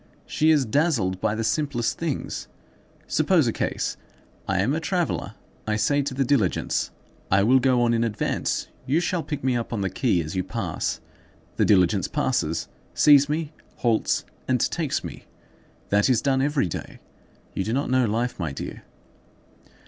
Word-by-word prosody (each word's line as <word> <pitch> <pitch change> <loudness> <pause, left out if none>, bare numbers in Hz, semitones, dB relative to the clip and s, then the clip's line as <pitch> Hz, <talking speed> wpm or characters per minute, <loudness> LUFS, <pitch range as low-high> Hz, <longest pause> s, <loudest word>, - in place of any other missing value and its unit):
She 155 - +1
is 150 -4 +4
dazzled 110 - +1
by 105 - +1
the 115 - -2
simplest 120 0 -1
things. 165 -5 -3 0.6
Suppose - - +3
a - - 0
case: - - -2 0.5
I 95 - 0
am 110 +9 +2
a 160 - 0
traveller; 175 +1 -2 0.3
I 105 - +1
say 145 +6 +2
to 135 -1 -4
the 135 - +2
diligence, 120 -9 +1 0.4
'I 100 +1 +4
will 130 +5 +5
go 125 -2 +3
on 120 0 +3
in 115 0 +2
advance; 110 -3 -1 0.2
you 145 +5 +3
shall 175 0 -1
pick 150 -4 -5
me 130 -1 +2
up 120 -1 -3
on 115 -4 -2
the 95 -2 -1
quay 95 -2 +1
as 80 +4 -6
you 95 - 0
pass.' 95 - -3 0.6
The - - +3
diligence 95 0 +3
passes, 125 - -1 0.3
sees 145 -1 +6
me, 155 0 -2 0.2
halts, 115 -3 +1 0.2
and 130 -1 +2
takes 160 -5 -1
me. - - -8 0.6
That 105 +4 +3
is 125 -4 +4
done 135 -1 +2
every 145 0 +1
day. 85 - -6 0.6
You 95 - -1
do 110 - -3
not 135 +2 -1
know 130 -1 +4
life, 115 +3 -1
my 80 -5 -2
dear." 70 - -7
125 Hz, 170 wpm, -24 LUFS, 105-145 Hz, 0.6 s, sees